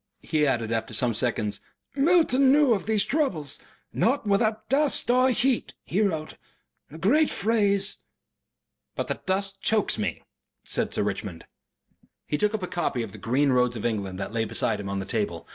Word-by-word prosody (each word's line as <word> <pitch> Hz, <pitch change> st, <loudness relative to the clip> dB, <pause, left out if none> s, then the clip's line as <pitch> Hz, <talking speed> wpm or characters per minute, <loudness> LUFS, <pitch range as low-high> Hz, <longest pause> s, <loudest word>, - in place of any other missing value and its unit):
He 150 Hz, -2 st, +1 dB
added 115 Hz, -4 st, -1 dB
after 115 Hz, -1 st, -2 dB
some 120 Hz, -2 st, +2 dB
seconds, 110 Hz, -3 st, -1 dB, 0.3 s
"Milton 280 Hz, -3 st, +4 dB
knew 285 Hz, -3 st, +5 dB
of 200 Hz, -1 st, -3 dB
these 215 Hz, -2 st, +2 dB
troubles. 215 Hz, -, -1 dB, 0.3 s
'Not 255 Hz, +1 st, +1 dB
without 215 Hz, +2 st, +1 dB
dust 275 Hz, -4 st, +2 dB
and 255 Hz, +1 st, +4 dB
heat' 255 Hz, 0 st, 0 dB
he 195 Hz, -, -1 dB
wrote 160 Hz, -7 st, -2 dB, 0.5 s
a 155 Hz, -, -11 dB
great 285 Hz, -, +3 dB
phrase." 205 Hz, -3 st, +1 dB, 1.0 s
"But -, -, -3 dB
the -, -, -3 dB
dust 195 Hz, +1 st, -2 dB
chokes 220 Hz, -, +1 dB
me," 100 Hz, -6 st, -3 dB, 0.4 s
said -, -, -1 dB
Sir -, -, 0 dB
Richmond. 95 Hz, -4 st, -4 dB, 0.8 s
He 150 Hz, -, -2 dB
took 210 Hz, +1 st, +1 dB
up 210 Hz, -, -4 dB
a -, -, -2 dB
copy 135 Hz, -9 st, -2 dB
of 110 Hz, -, -7 dB
THE 110 Hz, -, -11 dB
GREEN 135 Hz, +6 st, +1 dB
ROADS 125 Hz, -1 st, +2 dB
OF 110 Hz, -, -5 dB
ENGLAND 100 Hz, -5 st, -2 dB
that 95 Hz, +2 st, -5 dB
lay 115 Hz, -1 st, 0 dB
beside 105 Hz, -, 0 dB
him 100 Hz, -1 st, -5 dB
on 100 Hz, -, -2 dB
the 95 Hz, -, -3 dB
table. 100 Hz, -6 st, -3 dB
170 Hz, 180 wpm, -26 LUFS, -, 1.0 s, knew